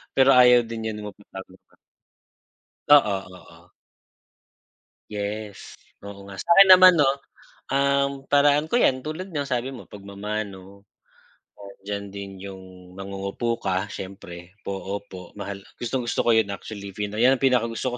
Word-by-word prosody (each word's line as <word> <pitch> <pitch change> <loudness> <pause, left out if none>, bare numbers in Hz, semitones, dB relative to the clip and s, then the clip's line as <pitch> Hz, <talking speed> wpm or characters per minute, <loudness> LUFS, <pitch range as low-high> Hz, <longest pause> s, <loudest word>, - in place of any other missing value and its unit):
pero 135 0 +5
ayaw 125 -1 +6
din 115 -1 -5
yun 105 0 -8
magpatawag 95 -2 -13
pa. - - -29 1.1
Oo, 140 -9 +6 0.2
oo. 90 -2 -17 1.4
Yes, 105 0 -6 0.3
oo 100 -1 -10
nga 100 -1 -11
sa'kin 190 - +6
naman 185 0 +9
no 145 -5 +4 0.6
ang 140 0 0
paraan 145 +2 +3
ko 240 - +2
yan 130 - +2
tulad 155 +6 -6
niyang 145 -4 -3
sabi 130 +1 -2
mo 125 - -10
pagmamano, 100 -1 -7 1.0
diyan 100 0 -5
din 100 -1 -7
yung 95 -1 -9 0.3
mangungupo 100 +4 -4
ka 95 +2 -2
siyempre, 95 -1 -10
po, 100 - -4
opo, 95 -2 -8
mahal. 100 -1 -6 0.2
Gustong 120 +1 -3
gusto - - 0
ko 120 - +5
yun 110 -2 +3
actually 100 -1 -8
yan 105 +5 +2
ang 135 - -9
pinakagusto 125 -1 +1
ko - - -8
105 Hz, 135 wpm, -24 LUFS, 100-135 Hz, 1.4 s, naman